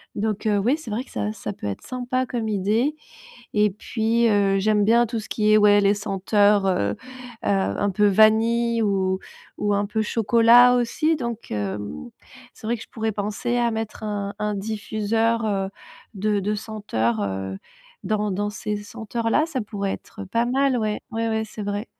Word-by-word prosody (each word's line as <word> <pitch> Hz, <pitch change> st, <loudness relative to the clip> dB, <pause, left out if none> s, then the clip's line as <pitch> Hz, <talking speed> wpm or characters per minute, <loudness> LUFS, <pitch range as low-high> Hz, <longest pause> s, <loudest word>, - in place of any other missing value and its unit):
donc 215 Hz, 0 st, -2 dB, 0.2 s
oui, 255 Hz, +7 st, +2 dB
c'est 315 Hz, -9 st, -9 dB
vrai 225 Hz, +4 st, -2 dB
que -, -, -21 dB
ça 105 Hz, 0 st, -2 dB
ça 105 Hz, -, -6 dB
peut -, -, -9 dB
être 100 Hz, -, -4 dB
sympa 255 Hz, 0 st, -2 dB
comme 235 Hz, -3 st, -3 dB
idée 215 Hz, +9 st, +1 dB, 0.6 s
et 210 Hz, -1 st, +4 dB
puis 225 Hz, +3 st, 0 dB
heu, 200 Hz, -2 st, +3 dB
j'aime 210 Hz, +1 st, +2 dB
bien 235 Hz, +2 st, +4 dB
tout 225 Hz, 0 st, -3 dB
ce 215 Hz, -, -11 dB
qui 215 Hz, -1 st, +2 dB
est 215 Hz, -, +7 dB
ouais 205 Hz, 0 st, +6 dB
les 200 Hz, +1 st, +3 dB
senteurs, 205 Hz, 0 st, +2 dB
heu 180 Hz, -, +1 dB
heu, -, -, -7 dB, 0.5 s
un 200 Hz, +1 st, +1 dB
peu 205 Hz, +2 st, +3 dB
vanille 225 Hz, +3 st, +4 dB
ou 190 Hz, -2 st, +1 dB, 0.4 s
ou 205 Hz, 0 st, 0 dB
un 200 Hz, 0 st, 0 dB
peu 220 Hz, +1 st, -1 dB
chocolat, 235 Hz, +3 st, +5 dB
aussi. 250 Hz, +7 st, +1 dB
Donc 235 Hz, -4 st, -5 dB
hem, 100 Hz, -6 st, -4 dB, 0.4 s
c'est -, -, -10 dB
vrai 235 Hz, +2 st, 0 dB
que 220 Hz, -, -10 dB
je -, -, -13 dB
pourrais 220 Hz, -1 st, -2 dB
penser 215 Hz, +4 st, -2 dB
à 240 Hz, -1 st, +2 dB
mettre 220 Hz, -1 st, -5 dB
un 205 Hz, -1 st, -3 dB
un 210 Hz, 0 st, -1 dB
diffuseur, 220 Hz, +2 st, -1 dB
heu, 195 Hz, -2 st, -1 dB, 0.5 s
de 205 Hz, +1 st, 0 dB
de 210 Hz, +2 st, -1 dB
senteurs, 200 Hz, -, -2 dB
heu, 95 Hz, 0 st, -3 dB, 0.5 s
dans 210 Hz, -1 st, 0 dB
dans 205 Hz, +2 st, -1 dB
ces 210 Hz, 0 st, -4 dB
senteurs 225 Hz, +2 st, -4 dB
là, 305 Hz, -, +3 dB
ça 280 Hz, -6 st, -3 dB
pourrait 200 Hz, -2 st, -3 dB
être 210 Hz, -, -8 dB
pas 230 Hz, +5 st, 0 dB
mal, 270 Hz, 0 st, +2 dB
ouais, 215 Hz, -2 st, -1 dB
ouais, 230 Hz, 0 st, -1 dB
ouais, 220 Hz, 0 st, 0 dB
c'est 215 Hz, 0 st, -8 dB
vrai. 205 Hz, +2 st, -3 dB
215 Hz, 185 wpm, -23 LUFS, 200-230 Hz, 0.6 s, est